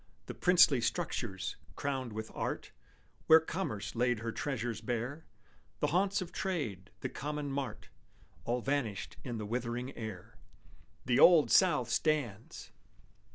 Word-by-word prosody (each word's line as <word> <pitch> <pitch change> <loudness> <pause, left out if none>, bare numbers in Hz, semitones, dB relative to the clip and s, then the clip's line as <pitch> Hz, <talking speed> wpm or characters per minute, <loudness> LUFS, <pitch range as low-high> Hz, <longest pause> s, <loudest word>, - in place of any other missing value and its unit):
The - - -6
princely 170 -8 +5
structures, 115 - -2 0.2
crowned 135 -4 -2
with 110 +1 -6
art, - - -3 0.6
Where 160 0 +9
Commerce 155 - -4
laid 120 -1 +1
her 115 0 -2
treasures 120 -4 -3
bare; 120 +7 -3 0.5
The - - +1
haunts 190 +1 +2
of 175 - -11
trade, 115 - -3
the - - -1
common 150 0 -4
mart, 135 -5 -4 0.5
All 120 +1 -1
vanished 125 -7 -2
in 120 -3 -4
the 105 - -4
withering 120 +3 -3
air, 110 -6 -8 0.7
"The 125 -1 +2
Old 170 -4 +7
South 150 - +4
stands!" 130 -9 -1
125 Hz, 130 wpm, -32 LUFS, 115-150 Hz, 0.7 s, Where